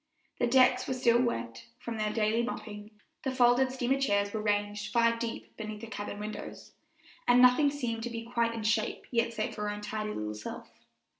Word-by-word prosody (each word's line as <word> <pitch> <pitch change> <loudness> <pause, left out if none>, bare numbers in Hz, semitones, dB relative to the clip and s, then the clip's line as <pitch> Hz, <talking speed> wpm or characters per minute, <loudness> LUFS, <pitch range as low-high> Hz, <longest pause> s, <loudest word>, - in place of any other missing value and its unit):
The 240 - +2
decks 255 +1 +4
were 260 - -1
still 240 -1 +4
wet 115 - -3
from 235 -1 -6
their 215 -1 0
daily 220 +1 +1
mopping, 210 -3 -6 0.3
the 265 - -2
folded 255 0 +4
steamer 265 +1 0
chairs 200 -5 +1
were 220 - -2
ranged 205 0 -1
five 230 0 +3
deep 230 -1 -5
beneath 215 -1 -6
the - - -6
cabin 205 -2 -6
windows, 210 +1 -7 0.6
and 245 0 +6
nothing 250 +4 +6
seemed 245 -6 -3
to 240 - -3
be 230 -1 -5
quite 235 -1 0
in 225 - -4
shape 215 0 0
yet 230 -1 +1
save 215 -2 -3
her 210 0 -2
own 205 0 -5
tidy 215 0 -4
little 105 0 -3
self. 105 0 -7
230 Hz, 195 wpm, -30 LUFS, 210-245 Hz, 0.6 s, and